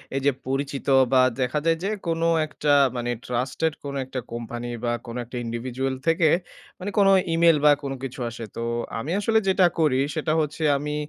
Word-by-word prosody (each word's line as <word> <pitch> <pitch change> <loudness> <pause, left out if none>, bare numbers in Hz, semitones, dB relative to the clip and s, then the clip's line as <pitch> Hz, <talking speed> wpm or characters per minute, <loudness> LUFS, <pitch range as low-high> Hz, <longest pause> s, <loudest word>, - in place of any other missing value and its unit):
এই 135 - 0
যে 140 - +5 0.2
পরিচিত 135 +1 -3 0.3
বা 130 - +6 0.2
দেখা 130 +4 0
যায় 165 0 +3
যে 195 - 0 0.2
কোন 165 0 -1 0.2
একটা 150 -1 0 0.2
মানে 120 0 -2
ট্রাস্টেড 130 +6 -1
কোন 140 -1 -5
একটা 130 0 -5
কোম্পানি 120 +1 -5
বা 120 - 0
কোন 115 -1 -7
একটা 125 +2 -7
individual 125 +3 -3
থেকে 165 -1 +4 0.5
মানে 185 - -4
কোন 200 -1 +5 0.3
ইমেইল 165 -1 +5
বা 150 - +8
কোন 140 - -3
কিছু 135 0 -6
আসে। 115 0 -8
তো - - -4 0.4
আমি 145 +8 -4
আসলে 220 +2 +2
যেটা 190 -1 +4
করি 145 -5 +3 0.2
সেটা 155 0 0
হচ্ছে 150 +1 -3
আমি 150 +1 -3
140 Hz, 185 wpm, -24 LUFS, 125-160 Hz, 0.5 s, বা